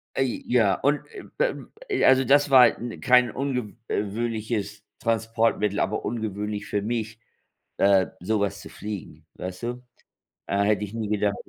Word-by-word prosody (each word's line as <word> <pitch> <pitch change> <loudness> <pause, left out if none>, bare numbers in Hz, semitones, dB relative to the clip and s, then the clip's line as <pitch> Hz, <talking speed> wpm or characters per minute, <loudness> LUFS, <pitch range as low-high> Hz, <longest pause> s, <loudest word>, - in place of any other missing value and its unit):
Äh, 130 -3 -1
ja, 110 -6 +3
und, 145 +7 +1 0.4
äh, - - +4
ähm, - - -9 0.2
äh, 400 - 0
also, 130 0 +6
das 145 +2 +4
war, 125 -3 +6
äh, 120 -1 -6
kein 125 -1 +4
unge 125 -6 -3
äh, - - 0
-wöhnliches 105 -1 -3 0.2
Transportmittel, 115 -2 0
aber 100 +3 -1
ungewöhnlich 105 -2 -3
für 105 - -1
mich, 110 0 -3 0.6
äh, 100 -1 +4
sowas 100 +1 -1
zu - - -10
fliegen, 95 -7 -8
weißt 90 +2 -7
du? 125 +1 -4 0.6
Äh, 100 0 +1
hätte 105 0 +2
ich 105 0 -6
nie 110 -2 -3
gedacht. 105 -1 +1
110 Hz, 155 wpm, -25 LUFS, 100-120 Hz, 0.6 s, also